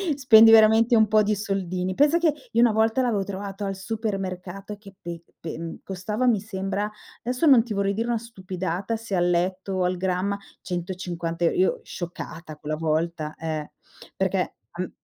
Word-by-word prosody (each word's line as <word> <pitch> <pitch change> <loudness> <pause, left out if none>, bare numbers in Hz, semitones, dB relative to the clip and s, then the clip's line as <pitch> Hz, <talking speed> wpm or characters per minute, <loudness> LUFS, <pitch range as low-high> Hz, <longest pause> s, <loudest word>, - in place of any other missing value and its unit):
spendi 225 -5 +7
veramente 225 +2 +6
un 220 -2 +4
po' 215 -1 +5
di 210 0 +1
soldini. 185 -3 -2
Pensa 290 - +4
che 325 -3 +3 0.2
io 230 - +3
una 240 -2 +6
volta 225 +3 +2
l'avevo 220 -6 +1
trovato 200 0 -5
al 195 - -2
supermercato 195 -1 -4
che 195 -2 -15
pe 170 -1 -6 0.2
pe 160 -1 -5
mhmm, 165 0 -5
costava 210 +6 -3
mi 235 -4 +4
sembra, 195 0 -3 0.3
adesso 250 +7 -1
non 255 -6 +7
ti 230 -3 -5
vorrei 200 0 0
dire 230 +3 -2
una 235 -1 +1
stupidata 190 -2 -4
se 220 -3 -4
all'etto 180 +2 0
o 185 - 0
al 180 0 0
grammo, 190 +2 -1 0.2
150 175 -1 -4
euro, 165 - +2
io 185 - +2
scioccata 165 -2 -7
quella 150 +1 -4
volta, 160 0 -1
eh, 155 -2 -4 0.4
perché - - 0 0.2
am - - -4
195 Hz, 170 wpm, -25 LUFS, 180-220 Hz, 0.4 s, spendi